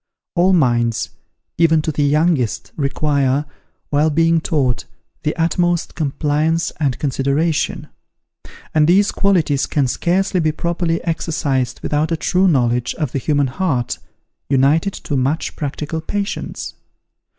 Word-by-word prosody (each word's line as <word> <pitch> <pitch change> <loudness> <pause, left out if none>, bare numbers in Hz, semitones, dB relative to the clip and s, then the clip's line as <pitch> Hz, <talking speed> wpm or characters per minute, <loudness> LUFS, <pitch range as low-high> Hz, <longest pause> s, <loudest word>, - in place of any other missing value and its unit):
All 180 +1 +3
minds, 120 -9 +2 0.5
even 160 -2 +4
to 155 - -1
the 150 - -2
youngest, 150 -4 +1
require, 140 -1 +1 0.5
while 150 +2 +3
being 165 +2 +3
taught, 135 -7 0 0.4
the 150 - -1
utmost 175 0 0
compliance 155 +2 0
and 140 -5 0
consideration; 145 +3 0 0.9
and 155 -1 +4
these 195 +4 +4
qualities 165 -8 +1
can 145 -3 +1
scarcely 185 +7 0
be 155 -2 +1
properly 170 0 -1
exercised 145 -7 -1
without 150 +2 0
a 165 - +1
true 185 +4 +2
knowledge 120 -6 +1
of 150 -6 -2
the 135 - -1
human 145 +1 +1
heart, 130 -3 -1 0.5
united 145 +8 +3
to 145 - -4
much 135 +5 -1
practical 150 +2 -4
patience. 200 +4 -4
155 Hz, 125 wpm, -19 LUFS, 140-165 Hz, 0.9 s, even